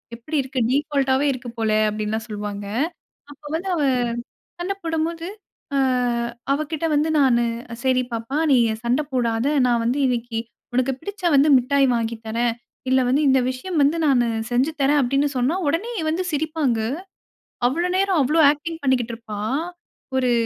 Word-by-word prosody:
எப்படி 270 +7 -4
இருக்கு." 260 0 -4
டிஃபால்ட் 280 0 +1
ஆவே 275 +2 +1
இருக்கு 250 -1 -7
போல 220 -1 +1 0.2
அப்படில்லாம் 215 +1 -3
சொல்வாங்க. 205 -1 -5 0.7
அப்ப 290 +1 -16
வந்து 360 +4 -3
அவ, 310 - 0 0.8
சண்ட 360 +3 -2
போடும்போது, 330 +1 -2 0.5
அ, - - +2 0.8
அவகிட்ட 310 +2 -2
வந்து 300 +2 +2
நானு, 245 -4 +4 0.4
"சரி 255 -1 +3
பாப்பா, 230 +5 -3
நீ 265 - +6 0.3
சண்ட 245 +5 +2
போடாத. 235 -2 0 0.2
நான் 235 -1 +2
வந்து 250 +5 +1
இன்னைக்கு 235 -2 -2 0.3
உனக்கு 255 +2 +1
பிடிச்ச 405 +2 -8
வந்து 280 +2 +5
மிட்டாய் 275 +2 +2
வாங்கி 230 0 -1
தறேன். 230 +1 0 0.4
இல்ல 260 0 +4
வந்து, 275 +4 +3
இந்த 265 0 +5
விஷயம் 310 +7 -3
வந்து 290 +4 +2
நானு 245 -4 +3 0.2
செஞ்சு 255 +6 +2
தறேன்" 285 +2 +4
அப்படின்னு 275 +3 +1
சொன்னா 255 +7 +1
உடனே 340 +11 0 0.2
வந்து 350 +4 -1
சிரிப்பாங்க. 300 -5 0 0.9
அவ்ளோ 340 +8 0
நேரம் 380 -4 +2
அவ்ளோ 305 +5 +3
ஆக்டிங் 320 +2 -6
பண்ணிக்கிட்டுருப்பா. 230 -5 -1 0.8
ஒரு 255 -1 +2
265 Hz, 145 wpm, -22 LUFS, 240-310 Hz, 0.9 s, நீ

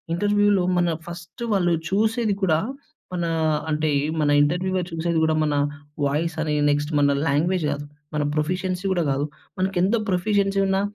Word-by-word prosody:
ఇంటర్‌వ్యూ‌లో 205 0 +3 0.2
మన 175 -1 +2 0.2
ఫస్ట్ 170 +5 -8
వాళ్ళు 175 -3 +2 0.2
చూసేది 220 +1 +1
కూడా, 160 -4 +3 0.5
మనా 170 -2 -1 0.4
అంటే, 155 0 +1 0.3
మన 150 - +2
ఇంటర్‌వ్యూ‌లో 185 +4 0
చూసేది 165 0 -1
గూడా 160 0 +2
మనా 145 -1 +1 0.5
వాయిసని, 155 +1 -1 0.2
నెక్స్ట్ 145 +1 -1
మన 140 0 +4 0.2
లాంగ్వేజ్ 165 +4 +1
గాదు, 145 +1 -4 0.3
మన 150 - +1
ప్రొఫిషియన్సీ 180 +4 -1
గూడా 175 -2 +1
గాదు. 135 +2 0 0.3
మనకెంత 190 +2 +1
ప్రొఫిషియన్సీ 195 +1 +1
ఉన్నా 195 0 +1
175 Hz, 135 wpm, -23 LUFS, 155-190 Hz, 0.5 s, మన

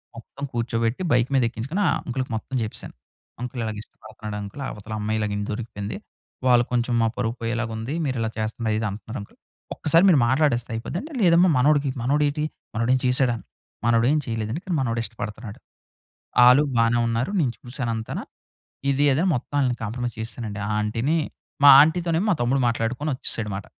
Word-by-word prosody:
మొత్తం 120 +4 -10
కూర్చోబెట్టి 115 +3 -1
బైక్ 120 +1 +3
మీద 130 - +4
ఎక్కించుకొని 135 - -3
ఆ - - +4 0.2
అంకల్‌కి 130 0 -3
మొత్తం 130 +4 -5
జెప్పేసాను. 110 -1 -5 0.5
అంకల్ 125 0 -4
ఇలాగ 110 -1 -3
ఇష్టపడుతున్నాడు 110 -1 -9
అంకల్ 100 +8 -8
అవతల 105 +1 -8
అమ్మాయి 110 +1 -1
ఇలాగ 105 -1 -1
ఇంట్లో 105 - -3
దొరికిపోయింది 105 -2 -5 0.5
వాళ్ళు 120 -1 +6
కొంచెం 120 0 0
మా 115 - +3
పరువు 115 -2 -1
పోయేలాగా 115 0 -2
ఉంది. 115 +6 -4
మీరిలా 120 -5 -1
చేస్తున్నారు 110 0 -1
ఇది 110 - -2
అంటున్నారు 110 +5 -7
అంకల్. 100 - -13 0.4
ఒక్కసారి 165 +4 +3
మీరు 155 - +5
మాట్లాడేస్తే 130 -3 +2
అయిపోద్ది 115 +9 -4
అంటే 310 +1 -10
"లేదమ్మా 175 0 +5
మనోడికి 145 +1 +3
మనోడేటి? 145 +3 +1 0.3
మనోడు 115 +2 +1
ఏమైన 130 - +1
చేసాడా?" 125 -2 +2 0.5
మనోడు 115 0 +3
ఏం 155 - +3
చేయలేదండి 115 +5 -3
కానీ 185 -3 -2
మనోడు 120 -3 -1
ఇష్టపడుతున్నాడు. 110 -1 -6 0.9
ఆలు 125 +4 +7
బానే 115 +1 +3
ఉన్నారు. 115 - -1
నేను 130 -8 +1
చూసానంతన 120 -3 -4 0.7
ఇది 140 +2 +2
అది 135 +5 +2
అని 190 - +2
మొత్తం 125 - -5
ఆళ్ళని 125 -3 +1
కాంప్రమైజ్ 120 +2 -3
చేసేసానండి. 110 -2 -5
ఆ - - -3
ఆంటీ‌ని, 115 +9 0 0.5
మా 145 - +10
ఆంటీ 160 +4 +3
తోనేమో 170 +3 +1
మా - - +3
తమ్ముడు 130 +3 +2
మాట్లాడుకొని 120 +6 -1
ఒచ్చేసాడు 115 -3 -3
అన్నమాట. 100 0 -5
120 Hz, 170 wpm, -24 LUFS, 110-135 Hz, 0.9 s, మా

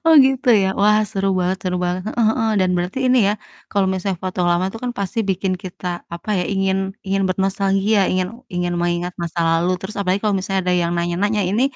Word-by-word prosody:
Oh, 325 - +7
gitu 265 -1 -1
ya, - - +2
wah, 210 +1 +5
seru 195 -2 -1
banget 180 +1 0
seru 180 -1 -1
banget, 180 +1 -1
heeh 230 +1 0
heeh, 225 0 +1
dan 185 -1 +2
berarti 180 +8 -2
ini 255 0 +4
ya, - - +2 0.4
kalo 200 -1 +2
misalnya 190 -1 -2
foto 185 0 -3
lama 175 +1 +2
tuh 225 - -7
kan 250 - -1
pasti 200 +3 -3
bikin 190 0 0
kita, 185 0 -8 0.3
apa 170 +5 -11
ya, 180 - 0
ingin 195 -1 +1 0.3
ingin 195 +1 +1
bernostalgia, 195 +2 +1
ingin 185 0 +1 0.3
ingin 175 0 -1
mengingat 175 +1 -1
masa 170 0 -3
lalu, 165 +2 +2
terus 195 +3 -7
apalagi 195 0 0
kalo 210 - +2
misalnya 195 0 -1
ada - - +3
yang 170 - 0
nanya-nanya, 180 +5 0
"Ini 215 +5 +1
190 Hz, 210 wpm, -20 LUFS, 180-205 Hz, 0.4 s, Oh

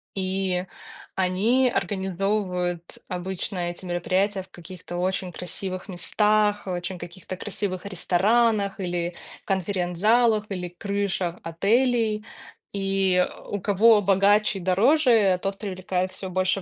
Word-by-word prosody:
и 190 -1 0 0.5
они 210 +8 +3
организовывают 190 -2 -2
обычно 185 +1 -4
эти 175 +2 -8
мероприятия 185 +3 0
в 190 - -15
каких-то 175 0 -9
очень 185 0 -1
красивых 185 +2 -5
местах, 210 +3 +1
в 185 - -3
очень 180 +1 -4
каких-то 175 +1 -8
красивых 195 -2 -4
ресторанах, 200 +3 +2
или 175 -1 -2 0.3
конференц-залах, 205 +4 +2
или 180 -3 -4
крышах 195 -1 -2
отелей. 215 +5 +1 0.5
И 195 -2 +2 0.2
у 205 - -3
кого 210 +2 +5
богаче 200 +1 +3
и - - -8
дороже, 210 - +4
тот 195 0 -2
привлекает 185 -2 -2
всё 185 0 -6
больше 185 +1 0
190 Hz, 110 wpm, -25 LUFS, 180-205 Hz, 0.5 s, кого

